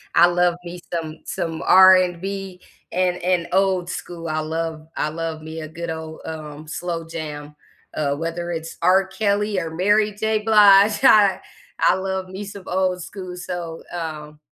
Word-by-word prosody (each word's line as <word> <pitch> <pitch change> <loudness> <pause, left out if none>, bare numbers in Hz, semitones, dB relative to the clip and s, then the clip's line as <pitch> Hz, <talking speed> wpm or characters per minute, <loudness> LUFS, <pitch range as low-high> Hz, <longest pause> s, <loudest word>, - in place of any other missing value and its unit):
I 175 +1 +7
love 175 0 +2
me 175 0 -8
some 160 -2 -4
some 165 -1 -4
R&B, 185 0 +4 0.3
and 180 0 +1
and 180 -1 0
old 185 -2 +1
school, 170 -2 -6
I 155 -1 -1
love 160 0 -4
I 150 - -1
love 160 0 -4
me 160 +1 -7
a 155 - -6
good 170 +2 -7
old, 160 0 -6
um, 155 -1 -8
slow 170 +1 -4
jam, 150 -2 -7 0.4
uh, 140 -2 0
whether 165 +3 -4
it's 165 0 -6
R. 190 +2 +4
Kelly, 205 0 0
or 165 -2 -4
Mary 205 +5 +2
J. 220 +1 0
Blige, 210 +1 +6
I 205 -6 +6 0.4
I - - +4
love 190 0 -3
me 190 +2 -6
some 200 -1 -9
old 185 -1 0
school, 185 0 -8
so, 175 -2 -6
um, 155 -3 -6
175 Hz, 160 wpm, -22 LUFS, 160-190 Hz, 0.4 s, I